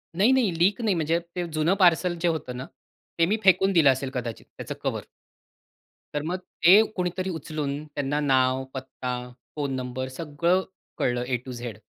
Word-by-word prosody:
नाही, 205 +8 +4
नाही. 255 -7 +3
लीक 195 +7 +3
नाही. 210 -5 +2
म्हणजे 165 +1 +1 0.2
ते 180 -1 -1
जुनं 155 +3 +2
पार्सल 175 -1 +4
जे 175 - +2
होतं 155 -7 -2
ना, 130 - -5 0.5
ते 165 - +6
मी 210 +6 +1
फेकून 190 +1 +5
दिलं 160 -6 +6
असेल 130 +1 -2
कदाचित 120 -3 -5
त्याचं - - -6
कव्हर. - - -2 1.1
तर 145 - 0
मग 175 +4 -2 0.3
ते 190 +5 +9
कोणीतरी 185 +1 -2
उचलून, 150 -3 -4
त्यांना 145 -1 -2
नाव, 130 -2 +2
पत्ता, 125 -2 -5 0.2
फोन 145 -3 -2
नंबर, 130 0 -4
सगळं 165 +6 0 0.3
कळलं 120 0 0
ए 125 -1 +1
टू 130 - -6
झेड 120 -4 -6
150 Hz, 170 wpm, -26 LUFS, 130-180 Hz, 1.1 s, ते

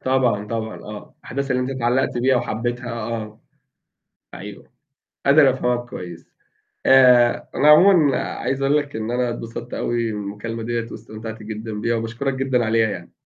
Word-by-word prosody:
طبعًا، 125 -6 +1
طبعًا 110 0 -4
آه، 105 0 -10
أحداث 140 +2 -4
اللي 125 0 +1
أنت 125 - -3
اتعلّقت 125 -1 0
بيها 130 +1 +3
وحبّيتها 120 +1 -3
آه. 110 -2 -5 0.9
أيوه، - - -10 0.6
قادر 140 0 +6
أفهمك 125 -1 -1
كويس. 85 -2 -8 0.6
آآ، 125 -2 +5
أنا 145 - +2
عمومًا 155 -2 +6
عايز 135 +1 -3
أقول 140 +2 +3
لك 145 -3 -4
إن 110 +1 -3
أنا 125 0 0
اتبسط 120 0 -7
أوي 115 -1 -1
من 105 -1 -4
المكالمة 110 +3 -5
دِيّة 115 0 -2
واستمتعت 110 0 -8
جدًا 110 +1 -6
بيها 115 +1 0
وباشكُرك 120 +4 -2
جدًا 130 -3 0
عليها 110 0 +2
يعني. 90 -4 -7
120 Hz, 155 wpm, -21 LUFS, 110-130 Hz, 0.9 s, قادر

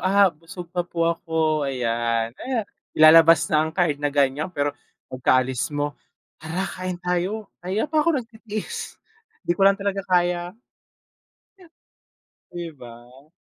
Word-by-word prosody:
"Ah, 195 -1 +4
busog 165 +2 -10
pa 180 - 0
po 170 -1 -2
ako." 160 -3 0
Ayan. 115 -2 -1
Ay, 250 -5 -2 0.3
ilalabas 165 +1 +7
na 155 - +5
ang 160 0 -1
card 160 -6 +1
na 145 - +1
ganyan, 140 +2 +1
pero 145 -5 -1 0.4
pagkaalis 130 0 +1
mo, 145 0 -1 0.5
"Tara, 160 +5 -3
kain 185 -1 -4
tayo. 180 +4 -2
Kanina 190 +5 -1
pa 310 - +4
ako 320 0 +2
nagtitiis, 220 -2 -7 0.5
'di - - +2
ko 175 - -8
lang 195 - +2
talaga 200 -1 -2
kaya." 175 +1 +1 2.0
'Di 175 -1 -6
ba? 125 +3 -14
165 Hz, 135 wpm, -23 LUFS, 145-185 Hz, 2.0 s, ilalabas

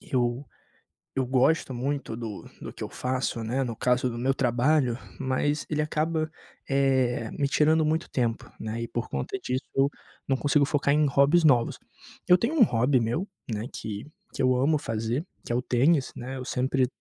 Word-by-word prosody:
Eu 125 +1 -1 0.7
eu 130 - 0
gosto 130 +2 +2
muito 135 -1 -2
do 115 -3 -6 0.2
do - - -6
que - - -14
eu - - -3
faço, 125 -2 -2
né, 125 +4 0
no 115 - -4
caso 125 +2 +1
do 120 - -6
meu 130 +3 +1
trabalho, 125 0 +2 0.2
mas 145 +3 0
ele 150 -1 0
acaba, 155 +1 -1 0.4
eh, 130 -4 +2
me 140 -1 -1
tirando 155 +2 +3
muito 160 +2 0
tempo, 115 -3 -1
né. 110 +1 -4
E - - -4
por 120 +1 -4
conta 195 - -3
disso, 130 -8 -3
eu 135 +1 +4 0.4
não 135 - +1
consigo 145 +1 +3
focar 140 0 +1
em 150 0 +4
hobbies 140 +5 +4
novos. 125 -6 +3 0.5
Eu 180 - +8
tenho 230 - -1
um 245 - +8
hobby 130 - +3
meu, 120 - -1 0.2
né, 110 +2 -3
que 105 -1 -5 0.3
que - - -3
eu 130 -1 +4
amo 140 +5 +3
fazer, 115 - -2 0.2
que - - -6
é - - +1
o 125 - +1
tênis, 130 +4 +2
né? 130 +2 -6
Eu 130 - -6
sempre 130 0 +1
130 Hz, 185 wpm, -27 LUFS, 120-150 Hz, 0.7 s, Eu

